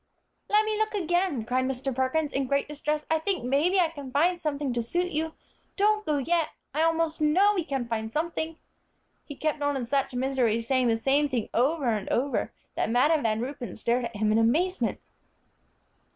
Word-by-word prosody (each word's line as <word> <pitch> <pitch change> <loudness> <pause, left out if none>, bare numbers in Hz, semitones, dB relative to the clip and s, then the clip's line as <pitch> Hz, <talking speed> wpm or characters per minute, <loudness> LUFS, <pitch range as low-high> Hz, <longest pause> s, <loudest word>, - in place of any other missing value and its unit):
"Let 425 +1 +4
me 435 0 0
look 435 0 0
again," 350 - 0
cried 255 +2 0
Mr. 265 +1 -2
Perkins, 280 +4 0
in 270 -1 0
great 280 +1 +1
distress, 300 +1 -2
"I 320 - +3
think 375 0 -1
maybe 295 +10 +2
I 340 -3 +3
can 285 -4 -8
find 340 +6 +2
something 285 -3 -2
to 240 - 0
suit 350 +10 -1
you. 315 +1 -2 0.4
Don't 425 +1 +2
go 300 -1 +2
yet, 325 +3 +1 0.2
I 305 - 0
almost 325 -1 +1
know 370 +7 +4
we 365 -4 0
can 270 -5 -3
find 220 -1 -3
something," 320 +2 -2 0.7
he 290 - -8
kept 305 0 -2
on 285 -1 +1
in 250 - -3
such 270 +1 -1
misery, 250 -3 +1
saying 255 +1 +2
the 225 -1 +2
same 280 +5 +2
thing 245 -5 -2
over 280 +5 +1
and 210 -3 -1
over, 275 +3 0 0.2
that - - -1
Madam 290 +7 +3
Van 220 -2 0
Ruypen 245 -5 -5
stared 235 +2 0
at 235 -1 -7
him 210 +1 +1
in 220 - +3
amazement. 335 +12 +1
285 Hz, 195 wpm, -27 LUFS, 250-325 Hz, 0.7 s, Let